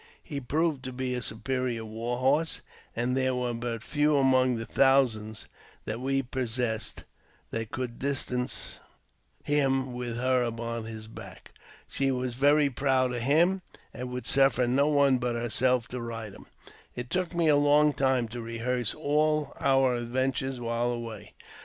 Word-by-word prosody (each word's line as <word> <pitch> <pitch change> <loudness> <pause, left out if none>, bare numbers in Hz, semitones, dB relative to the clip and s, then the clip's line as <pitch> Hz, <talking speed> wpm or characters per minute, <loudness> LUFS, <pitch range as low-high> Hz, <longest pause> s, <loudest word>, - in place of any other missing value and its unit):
He 145 -3 -5
proved 155 +2 0
to 130 - -4
be 130 0 -3
a 125 - -2
superior 120 0 -2
war 115 +3 -3
horse, 145 +6 +1 0.3
and 120 +2 0
there 130 -1 +1
were 125 -1 -1
but 115 -1 -4
few 150 +2 +2
among 130 -2 +3
the 115 0 -4
thousands 115 -6 +2 0.4
that 110 +2 -3
we 135 +1 0
possessed 120 -3 -2 0.5
that 115 -1 -3
could 125 -1 -5
distance 125 -2 -1 0.6
him 135 -3 +1
with 120 -1 -4
her 130 0 +2
upon 115 -1 -3
his 110 -1 -7
back. 110 - -11 0.4
She 135 0 -1
was 125 -1 -1
very 145 +3 +4
proud 130 -1 +1
of 120 - -2
him, 170 +9 +3 0.3
and - - -8
and 125 - -4
would 125 0 -5
suffer 135 -2 +4
no 135 +4 +2
one 140 -3 +4
but 120 -1 -1
herself 120 +1 +1
to 125 -1 -5
ride 115 -3 -6
him. - - -14 0.5
It 120 0 -6
took 180 -1 -1
me 170 -1 +3
a 150 - +6
long 145 +1 +4
time 130 -4 +1
to 120 +1 -6
rehearse 115 0 -2
all 150 -1 +1
our 135 -1 +3
adventures 130 +2 -1
while 120 0 -1
away. 115 -3 -7
125 Hz, 160 wpm, -28 LUFS, 120-135 Hz, 0.6 s, a